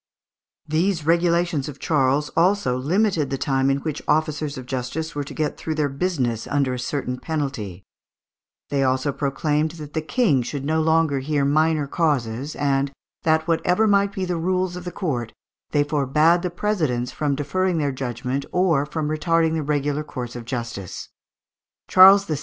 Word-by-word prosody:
These 165 +1 0
regulations 170 -3 +2
of 145 - -9
Charles 145 -1 +1
also 175 -7 +2
limited 160 +2 +1
the 135 - -2
time 135 -1 +1
in 135 - +2
which 155 -1 -4
officers 155 -1 0
of 130 - -7
justice 130 +5 -4
were 145 - -2
to 140 - -9
get 155 -2 -2
through 160 - -3
their 150 -2 0
business 135 -7 -1
under 140 -3 0
a 125 - -4
certain 125 0 -3
penalty; 130 - -4 0.9
they 140 -1 +1
also 130 +2 +1
proclaimed 150 +2 0
that 150 -2 -9
the 160 - -1
King 160 - +2
should 135 +3 -5
no 160 +2 +1
longer 160 -3 +2
hear 140 +1 0
minor 155 +1 +2
causes, 140 -4 -1
and 140 -1 0 0.3
that, 160 0 +2
whatever 180 +5 +2
might 200 -1 +3
be 190 -1 -3
the 180 -1 -2
rules 185 +1 0
of 180 0 -7
the 180 - -4
court, 130 - -3 0.4
they 145 -1 +2
forbad 150 +4 +2
the 180 - -2
presidents 160 - -1
from 145 -2 -1
deferring 175 +6 0
their 145 -3 0
judgment 130 +1 -3
or 165 -6 +2
from 155 -1 -3
retarding 160 +1 +1
the 160 - 0
regular 145 0 -1
course 125 -5 -6
of 120 -1 -7
justice. 115 -6 -5 0.8
Charles 195 +2 +8
VI. 155 -5 -2
150 Hz, 170 wpm, -23 LUFS, 135-165 Hz, 0.9 s, Charles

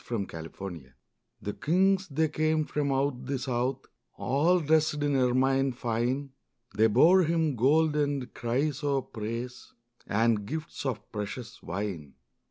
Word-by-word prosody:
Christmas 95 -8 -5
Carol 95 -4 -6 0.6
The 105 - -3
kings 190 +3 +2
they 160 +1 +1
came 155 0 +1
from 145 -2 -1
out 135 -2 -1
the 140 0 -1
south, 130 0 -2 0.3
All 155 +8 +2
dressed 155 0 +2
in 145 -1 +1
ermine 130 +1 +2
fine, 125 +3 -1 0.4
They 110 +1 +5
bore 160 - +6
Him 160 -3 +1
gold 150 +6 +3
and 145 -3 -1
chrysoprase, 125 -3 -2 0.3
And 110 -1 +1
gifts 155 0 -4
of 120 -5 -4
precious 115 +3 -6
wine. 90 -6 -5
135 Hz, 125 wpm, -28 LUFS, 115-150 Hz, 0.6 s, bore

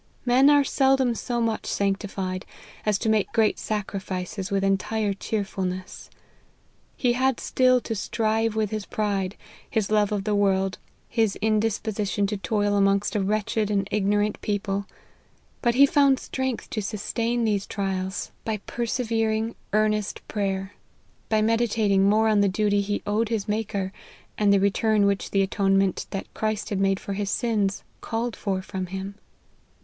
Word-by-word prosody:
Men 260 +3 +5
are 290 -1 +6
seldom 270 -3 +3
so 240 +1 -2
much 230 -2 -1
sanctified, 195 -2 -2 0.4
as 210 -2 +3
to 220 - -3
make 220 -2 +2
great 220 -2 +2
sacri 210 -2 -3
fices 185 +1 -4
with 195 -1 0
entire 200 +2 +1
cheerfulness. 190 -3 -4 0.9
He 245 -2 +2
had 260 0 +1
still 255 -1 +3
to 230 - -3
strive 220 +1 0
with 215 -2 0
his 215 -2 -4
pride, 200 -2 -1 0.3
his 215 -2 -1
love 210 -1 +3
of 205 -2 -1
the 210 0 0
world, 195 -1 +1 0.3
his 225 -4 +1
indisposi 215 -1 0
tion 205 - +1
to 205 +1 -2
toil 205 0 0
amongst 200 +2 +2
a - - +2
wretched 210 +1 0
and 200 -2 0
ignorant 205 0 +1
people; 200 -1 -2 0.7
but 240 -1 +2
he 275 +2 +8
found 280 -2 +4
strength 260 -3 -3
to 215 - -1
sustain 230 +3 -1
these 205 -3 0
trials 190 -1 -3
by 220 -1 -1
per 220 +4 -7
LIFE 235 +2 -1
OF 235 - -5
HENRY 225 -1 +1
MARTYN. 220 0 +1
23 - - -15
severing, - - -33 0.3
earnest 215 -1 -2
prayer; 195 -1 -2 0.6
by 215 -1 +3
meditating 215 -3 +2
more 220 +2 +4
on 215 -2 +4
the 200 - +3
duty 205 +1 +2
he 205 +1 -2
owed 210 +2 0
his 220 -3 -1
Maker, 205 -3 -2 0.4
and 205 -1 +3
the 200 - +5
return 205 +1 +2
which 200 -1 0
the 195 -1 +2
atonement 195 -1 +1
that 195 - -6
Christ 215 -1 -2
had 200 - 0
made 195 0 +2
for 200 - -5
his 200 0 -2
sins, 210 -4 0 0.2
called 230 +1 -2
for 190 -2 -2
from 190 -1 -4
him. 190 +2 -5
210 Hz, 170 wpm, -25 LUFS, 195-225 Hz, 0.9 s, he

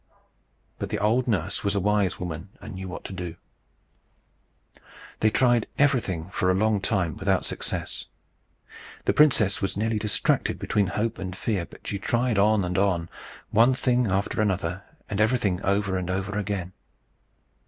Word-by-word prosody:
But - - -3
the - - -1
old 115 +5 +2
nurse 100 -9 -1
was 100 0 +1
a - - +2
wise 100 -2 +1
woman, 85 +1 -5
and 110 -1 -9
knew 95 0 -6
what 90 - -7
to - - -7
do. 90 -3 -5 1.8
They 110 - +4
tried 120 0 +3
everything 125 - +2
for 95 -2 +1
a 95 - +3
long 105 0 +2
time 95 - 0
without - - +1
success. - - -3 1.0
The - - +3
princess 120 -10 +4
was 95 0 -2
nearly 110 +1 0
distracted 105 -1 +1
between 100 -2 +1
hope 110 +3 -2
and 95 -1 -5
fear, 95 -4 -2
but - - -16
she 100 - -3
tried 120 0 +1
on 105 -1 +4
and 90 +1 0
on, 90 -4 +1 0.4
one 120 +4 +5
thing 125 -1 +2
after 100 +2 0
another, 95 -3 -1 0.3
and 100 0 -1
everything 110 -5 +1
over 100 -1 +1
and 90 -1 -3
over 95 +2 -2
again. 100 -3 -3
100 Hz, 160 wpm, -26 LUFS, 95-110 Hz, 1.8 s, one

